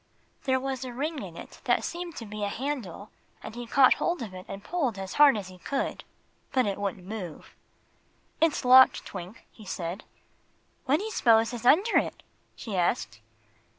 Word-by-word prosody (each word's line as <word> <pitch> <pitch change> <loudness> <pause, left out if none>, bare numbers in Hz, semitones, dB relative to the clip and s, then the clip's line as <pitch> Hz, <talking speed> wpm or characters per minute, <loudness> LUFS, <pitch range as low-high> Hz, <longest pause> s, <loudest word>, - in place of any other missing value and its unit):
There 260 -1 +2
was 265 -1 -3
a 255 - -5
ring 290 +4 -3
in 170 -3 -9
it - - -11
that - - +2
seemed 345 -1 -5
to 230 - -7
be 210 0 -6
a - - +1
handle, 220 - -5 0.3
and 215 - -7
he 240 0 -7
caught 260 +2 +6
hold 345 -7 0
of 205 -5 -8
it 185 0 -9
and 195 +1 -8
pulled 275 - -1
as 190 -1 -6
hard 285 -6 +8
as 195 -3 -6
he 185 -1 -13
could. 275 +9 -3 0.5
But 255 -2 +2
it 200 -1 -2
wouldn't 195 -3 -3
move. 190 -6 -7 0.9
"It's 320 -5 +2
locked, 260 +1 +7
Twink," 180 +6 -9
he 220 - -15
said. 185 -1 -5 0.8
"What 280 +3 +3
do 390 - -5
you'spose 230 - +3
is 240 0 -3
under 385 - +5
it?" - - -5 0.3
she 215 -4 -6
asked. 115 -10 0
230 Hz, 185 wpm, -28 LUFS, 195-270 Hz, 0.9 s, hard